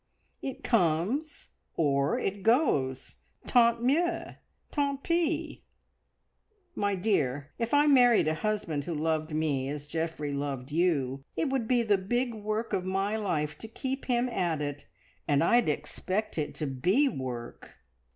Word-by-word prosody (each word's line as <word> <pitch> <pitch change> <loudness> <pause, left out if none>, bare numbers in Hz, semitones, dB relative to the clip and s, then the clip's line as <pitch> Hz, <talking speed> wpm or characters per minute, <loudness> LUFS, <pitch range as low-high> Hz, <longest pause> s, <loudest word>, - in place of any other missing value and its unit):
It 270 - -6
comes, 225 - 0 0.3
or 140 -2 +2
it 195 +1 -2
goes. 190 - +1 0.3
Tant 235 -1 +4
mieux! 325 +8 +1 0.4
Tant 280 -2 -1
pis! 335 -1 0 1.2
My 205 - 0
dear, 145 - 0
if 230 0 -1
I 290 +1 +5
married 245 - +5
a 155 - +2
husband 160 -5 -2
who 170 - -3
loved 155 +1 -1
me 140 -4 0
as 145 0 -5
Geoffrey 160 -1 -3
loved 140 -1 -4
you, 140 -6 +1
it 295 - 0
would 260 -5 0
be 245 -1 +3
the 205 -3 +2
big 240 +5 -1
work 215 +1 -3
of 185 - 0
my 195 +3 -1
life 160 -9 -2
to 225 - -8
keep 265 +4 -4
him 245 -1 +1
at 175 -9 -1
it, 145 -1 -5 0.4
and 145 +1 +3
I'd 235 +2 +4
expect 185 +6 -2
it 150 - -3
to 155 - -3
be 180 - +2
work! 125 - -6
190 Hz, 145 wpm, -29 LUFS, 150-240 Hz, 1.2 s, I